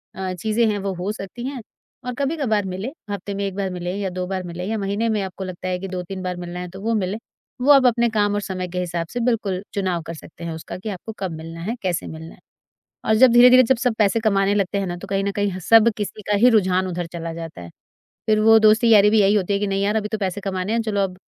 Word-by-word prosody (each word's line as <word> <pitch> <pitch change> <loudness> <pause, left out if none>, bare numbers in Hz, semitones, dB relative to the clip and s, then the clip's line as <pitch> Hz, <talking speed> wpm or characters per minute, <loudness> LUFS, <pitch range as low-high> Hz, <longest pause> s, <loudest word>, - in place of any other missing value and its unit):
अ, 190 -1 -3
चीजें 220 +5 0
हैं, 210 - 0
वो 195 -1 -3
हो 185 +4 -3
सकती 220 +4 -7
हैं 270 -3 -5 0.4
और 250 - -3
कभी-कभार 270 -8 0
मिले, 190 +5 -4 0.2
हफ़्ते 200 0 -4
में 200 0 -2
1 195 -1 -4
बार 195 -2 -2
मिले 180 0 -4
या 200 -2 -2
2 180 0 -4
बार 185 -1 -3
मिले 175 +1 -6
या 220 +3 -2
महीने 205 +3 -1
में 215 -2 0
आपको 190 0 -6
लगता 185 0 -6
है 180 - -1
कि 195 - -5
2-3 185 +1 -5
बार 180 -1 -3
मिलना 175 0 -6
है, 180 - -5
तो 190 +2 -10
वो 230 +2 0
मिलें। 195 +1 -1 0.4
वो 285 +3 +5
आप 270 -2 +6
अपने 235 0 +2
काम 205 -2 +1
और 205 - -1
समय 185 -2 -4
के 180 - -3
हिसाब 170 -2 -3
से, 245 - -2
बिल्कुल, 215 -6 0
चुनाव 185 -4 -1
कर 165 - -4
सकते 170 +2 -12
हैं 165 - -4
उसका 160 - -7
कि 190 +4 -6
आपको 205 +3 -6
कब 190 -3 -3
मिलना 165 +1 -8
है, 220 +7 -3
कैसे 175 -2 -1
मिलना 160 +1 -9
है। - - -25 0.7
और 220 - +4
जब 250 +1 +6
धीरे-धीरे, 250 +1 +8
जब 260 +2 +2
सब 245 -2 +1
पैसे 215 +2 +3
कमाने 200 -2 +2
लगते 200 0 0
हैं 195 - -1
ना, 175 0 -4
तो 195 - -9
कहीं 195 0 0
न 200 - -1
कहीं 205 0 0
ह 185 - -5
सब 225 0 +7
किसी 210 +1 -5
का 205 - +3
ही 240 +5 +6
रुझान 190 -4 +2
उधर 175 -1 -3
चला 165 -1 -5
जाता 165 - -8
है। 85 - -10 0.6
फिर 215 -1 +3
वो 225 +1 +7
दोस्ती-यारी 215 -1 +6
भी 220 -1 +4
यही 200 +1 +4
होती 200 -1 +1
है 200 - +1
कि, 205 - 0
"नहीं 195 0 -1
यार, 210 +2 +1
अभी 210 -1 -1
तो 220 - -3
पैसे 195 0 -2
कमाने 190 +1 -2
हैं। 230 - +1
चलो, 210 -2 -1
अब 185 -1 -3
200 Hz, 275 wpm, -22 LUFS, 180-220 Hz, 0.7 s, धीरे-धीरे